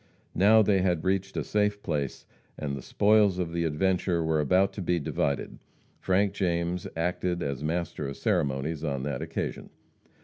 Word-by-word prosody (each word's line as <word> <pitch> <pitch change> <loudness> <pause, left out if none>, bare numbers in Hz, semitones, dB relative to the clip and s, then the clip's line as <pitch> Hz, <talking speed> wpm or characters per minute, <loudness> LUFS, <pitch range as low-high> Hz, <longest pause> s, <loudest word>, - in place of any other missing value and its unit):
Now 110 +3 +6
they 100 -2 +3
had 90 -3 +1
reached 95 +1 -1
a - - 0
safe 105 -1 0
place, 75 -6 -3 0.3
and 70 -2 -3
the 70 - -6
spoils 105 - +3
of 85 -2 -2
the 85 0 0
adventure 85 +2 +1
were 80 -1 +1
about 90 +7 +3
to 100 - -5
be 90 -1 +1
divided. 70 -1 -2 0.4
Frank 95 +1 +1
James 85 -2 -1
acted 90 +1 -1
as 70 0 -3
master 80 -2 -2
of 70 - -6
ceremonies 70 +3 -1
on 70 -4 -2
that 70 -3 -3
occasion. - - -4
85 Hz, 165 wpm, -28 LUFS, 75-95 Hz, 0.4 s, Now